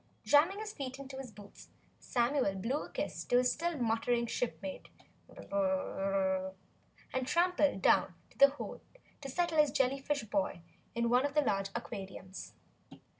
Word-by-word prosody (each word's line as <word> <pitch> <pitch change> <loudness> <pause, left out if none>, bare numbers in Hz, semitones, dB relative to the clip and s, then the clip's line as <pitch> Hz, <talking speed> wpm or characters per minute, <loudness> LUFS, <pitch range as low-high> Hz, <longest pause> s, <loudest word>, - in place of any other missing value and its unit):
Jamming 320 +7 +5
his 430 0 -5
feet 265 -2 -5
into 270 -1 -8
his 265 -2 -6
boots, 205 -1 -14 0.3
Samuel 245 -4 +1
blew 235 +10 -2
a - - -13
kiss - - -3
to 245 - +3
his 250 0 +4
still 340 0 -2
muttering 235 0 +1
shipmate 245 +4 -4 0.4
and 190 -1 -1 0.8
tramped 355 +4 +2 0.2
down 185 -2 +4 0.2
to - - -22
the 275 - +9
hold 285 - -7 0.4
to 275 - -6
settle 330 +2 +1
his 300 -1 +6
jellyfish 275 0 0
boy 195 -5 -1 0.3
in 235 0 +1
one 250 +2 +5
of 285 0 -2
the 300 - +5
large 195 -7 0
aquariums. 190 -4 -7
250 Hz, 145 wpm, -33 LUFS, 195-285 Hz, 0.8 s, the